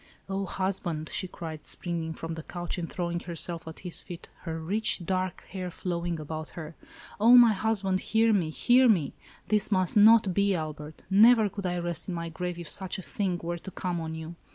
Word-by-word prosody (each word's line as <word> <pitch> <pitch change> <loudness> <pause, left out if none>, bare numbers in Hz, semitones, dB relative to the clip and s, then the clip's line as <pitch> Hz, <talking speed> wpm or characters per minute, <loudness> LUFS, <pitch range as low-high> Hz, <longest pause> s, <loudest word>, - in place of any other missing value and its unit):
" - - -34
O 195 -1 -2
husband! 175 -5 -2
" - - -9
she 185 - -2
cried, 160 -4 -8
springing 170 -1 -2
from 165 0 -5
the 160 - -6
couch 175 +2 -5
and 165 - -4
throwing 175 -1 -2
herself 170 -1 -2
at 160 - -9
his 180 -2 -2
feet, 175 -2 -10 0.2
her 165 -1 -3
rich, 190 +2 +1
dark 185 0 -2
hair 185 -1 -4
flowing 175 -1 -3
about 155 +1 -6
her, 160 -1 -7 0.5
"O 230 +4 +7
my 235 -2 +8
husband, 195 -2 +1
hear 225 +2 +2
me, 180 -6 +1
hear 245 +9 +4
me! 175 -10 +2 0.4
This 210 0 +2
must 185 -3 +2
not 210 -2 +6
be, 200 +1 +2
Albert. 155 -1 -6
Never 220 +2 +6
could 195 0 -4
I 180 0 -1
rest 175 +1 -4
in 180 - -2
my 170 0 -4
grave, 180 +1 -4
if 170 -2 -7
such 190 +3 -2
a 190 - -7
thing 185 -3 -2
were 170 +1 -3
to 190 - -8
come 180 -2 -3
on 160 0 -5
you. 160 +1 -7
175 Hz, 210 wpm, -28 LUFS, 165-195 Hz, 0.5 s, my